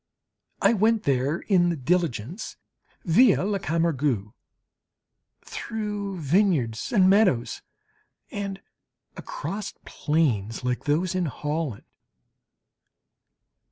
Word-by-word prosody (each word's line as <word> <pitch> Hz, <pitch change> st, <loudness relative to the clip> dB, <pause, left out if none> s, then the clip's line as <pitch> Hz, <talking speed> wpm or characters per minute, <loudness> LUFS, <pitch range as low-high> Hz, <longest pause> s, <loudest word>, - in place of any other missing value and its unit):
I -, -, +5 dB
went 220 Hz, +1 st, +2 dB
there 140 Hz, +5 st, 0 dB
in 180 Hz, -4 st, +3 dB
the 170 Hz, -, 0 dB
diligence, 165 Hz, -, -2 dB, 0.5 s
via 190 Hz, +2 st, +5 dB
la 200 Hz, -1 st, 0 dB
Camargue, 145 Hz, -, 0 dB, 1.1 s
through 210 Hz, -3 st, -4 dB
vineyards 150 Hz, -, +1 dB
and 190 Hz, -5 st, +5 dB
meadows, 190 Hz, -, +3 dB, 0.7 s
and 200 Hz, -1 st, -4 dB, 0.6 s
across 215 Hz, -, -5 dB
plains, 125 Hz, -9 st, 0 dB
like 125 Hz, 0 st, -2 dB
those 165 Hz, +5 st, +1 dB
in 185 Hz, -2 st, 0 dB
Holland. 150 Hz, -4 st, -3 dB
170 Hz, 85 wpm, -25 LUFS, 140-200 Hz, 1.1 s, I